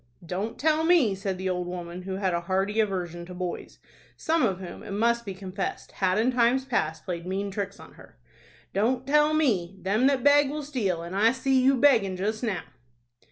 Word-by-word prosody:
"Don't 190 +6 -4
tell 310 +2 +2
me," 325 - +4
said 195 -1 -3
the 190 +1 -3
old 180 -1 -2
woman, 175 0 -6
who 190 +1 -5
had 190 -2 -1
a 170 - 0
hearty 195 +4 -1
aversion 180 -5 -1
to 180 - -9
boys, 180 -1 -5 0.4
some 325 0 +1
of 195 -6 +1
whom, 185 -2 -8
it - - -10
must 235 +3 +1
be 195 - -4
confessed, 190 0 -5
had 185 0 0
in 235 +4 +2
times 250 +2 +2
past 160 -11 -2
played 175 -1 -5
mean 195 +2 -2
tricks 200 0 -4
on - - -13
her; - - -17 0.6
"don't 245 +6 +1
tell 300 +2 +3
me! 195 - +1
Them 205 +8 +2
that 270 -3 +1
beg 285 -1 +5
will 300 +1 -4
steal, 205 - -2
and 170 +2 -6
I 220 +3 +4
see 265 0 +1
you 265 +1 +4
beggin' 220 -9 +3
just 215 +3 -2
now." 215 -7 -2
200 Hz, 205 wpm, -26 LUFS, 185-255 Hz, 0.6 s, beg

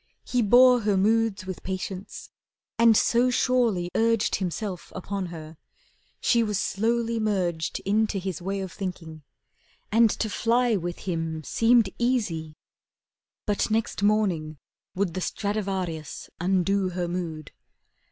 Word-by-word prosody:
He 250 - +1
bore 245 +3 +6
Her 205 -2 +1
moods 215 -1 +1
with 185 -1 -6
patience, 190 0 -6 0.5
and 230 -2 +6
so 240 +2 +3
surely 235 -8 +1
urged 230 -1 +2
Himself 185 0 -4
upon 195 0 -4
her, 160 -2 -9 0.6
she 235 - +3
was 210 -3 0
slowly 230 +3 0
merged 180 -7 -1
Into 210 +1 +1
his 185 -2 -4
way 195 +2 -3
of 190 -2 -5
thinking, 165 -5 -6 0.7
and 225 +1 +5
to 220 - -2
fly 235 +2 +1
With 175 -2 -4
him 165 -3 -3
seemed 230 - +3
easy. 205 -11 -1 0.9
But 205 +1 0
next 220 -2 -1
morning 190 -8 +1 0.4
would 185 -3 -1
The 185 - -3
Stradivarius 190 -7 -3
undo 190 +2 +1
her 180 -1 -3
mood. 165 -4 -5
195 Hz, 125 wpm, -26 LUFS, 175-225 Hz, 0.9 s, bore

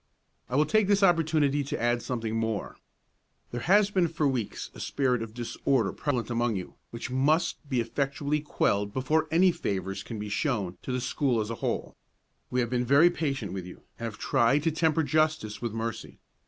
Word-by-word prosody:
"I 125 - -2
will 150 +2 +4
take 215 +1 +3
this 200 0 +3
opportunity 155 -5 +3
to 140 - -4
add 120 +1 +1
something 115 -3 -3
more. 110 -3 -2 0.8
There 120 - -4
has 205 +5 +4
been 185 -4 +3
for 160 -1 -3
some 140 - +3
weeks 120 -5 -4
a - - -12
spirit 125 -4 0
of 115 -1 -7
disorder 120 -1 0
prevalent 125 -5 -2
among 120 -1 +1
you, 90 -2 -5 0.2
which 120 +2 -6
must 145 +3 +1
be 130 -3 +1
effectually 140 +4 -1
quelled 100 -8 0
before 155 +5 +1
any 180 +4 +5
favors 95 - -3
can 115 - -7
be 105 0 -5
shown 105 - -1
to - - -5
the 125 0 -1
school 125 -2 0
as 110 +1 -2
a 115 - -6
whole. - - -2 0.5
We 125 - +1
have 120 - -1
been 125 -1 +1
very 140 +7 +5
patient 135 - -2
with 95 -2 -5
you, 90 - -12 0.2
and 115 - -4
have 110 -2 -5
tried 135 +2 +2
to 165 - +2
temper 160 0 +2
justice 155 -6 0
with 120 -2 -2
mercy. 115 0 -5
130 Hz, 195 wpm, -28 LUFS, 115-155 Hz, 0.8 s, any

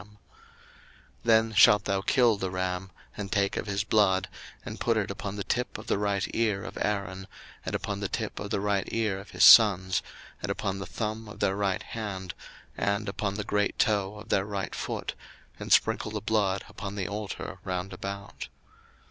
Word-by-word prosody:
02:029:020 105 - -16 1.2
Then 110 -1 +4
shalt 105 0 +6
thou 100 -1 0
kill 120 +2 +4
the 95 -2 -3
ram, 90 0 -2 0.3
and 100 -2 -5
take 100 -1 +1
of - - -3
his 100 0 0
blood, 100 -3 +2 0.4
and - - -6
put - - +1
it - - -1
upon 100 0 -5
the 100 - -3
tip 125 +4 -2
of - - -10
the - - 0
right 100 -2 0
ear 105 -4 +1
of - - -8
Aaron, 95 -2 -2 0.4
and - - -3
upon 100 -1 -3
the 100 - -1
tip 110 -3 -3
of 105 - -5
the 105 - 0
right 100 -1 0
ear 110 -4 0
of 100 - -12
his - - +1
sons, 95 -5 +7 0.4
and - - -3
upon 95 -2 -2
the 95 - -6
thumb 110 +1 -4
of 105 - -11
their 95 -1 +1
right 100 -2 0
hand, 95 -5 -5 0.4
and 100 +2 -1
upon 100 0 -2
the 105 - -2
great 105 0 0
toe 100 -2 +1
of 105 - -11
their 95 - +2
right 100 -3 -3
foot, - - -4 0.5
and - - -6
sprinkle - - +3
the 105 0 -3
blood 100 -3 0
upon 100 0 -7
the 100 -3 -2
altar 100 -2 -5
round 95 0 -3
about. 100 +2 -6
100 Hz, 190 wpm, -28 LUFS, 95-105 Hz, 1.2 s, sons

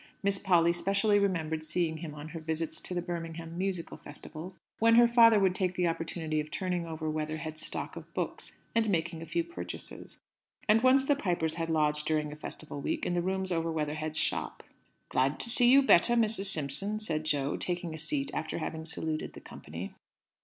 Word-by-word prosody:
Miss 200 0 +1
Polly 170 -3 +4
specially 200 +3 +2
remembered 160 -5 0
seeing 160 0 0
him 155 -2 -7
on 150 +1 -8
her 165 0 -6
visits 160 0 -2
to 180 - -3
the 175 - -1
Birmingham 165 -1 -5
Musical 185 -2 -3
Festivals, 160 +4 -8 0.2
when 230 +1 +5
her 240 0 +8
father 230 -2 +7
would 190 -2 +3
take 185 -1 -1
the 180 - +1
opportunity 165 -1 -2
of 150 0 -4
turning 180 0 -2
over 160 -1 -4
Weatherhead's 155 0 -3
stock - - -4
of - - -10
books, - - -3 0.2
and 225 -1 +2
making 165 -3 -1
a 165 - -7
few 340 - 0
purchases. 340 +1 -7 0.5
And 220 +1 +5
once 260 +2 +5
the 290 - +3
Pipers 175 - -1
had 165 0 -3
lodged 150 -1 +1
during 150 -1 0
a - - -7
Festival 150 -1 -6
week - - -2
in - - 0
the 175 - +1
rooms 190 +1 -1
over 165 -1 0
Weatherhead's 155 0 -2
shop. - - -1 0.5
"Glad 135 +3 +1
to 235 - +3
see 245 0 +6
you 275 +2 +7
better, 240 -1 +5
Mrs. 220 -3 +2
Simpson," 195 +5 0
said 160 -8 -2
Jo, 145 -2 0
taking 175 -2 -3
a 160 - -7
seat 150 -3 0
after 160 - -3
having 160 -1 -4
saluted 160 -1 -3
the - - -10
company. 85 +5 -8
165 Hz, 195 wpm, -30 LUFS, 155-195 Hz, 0.5 s, her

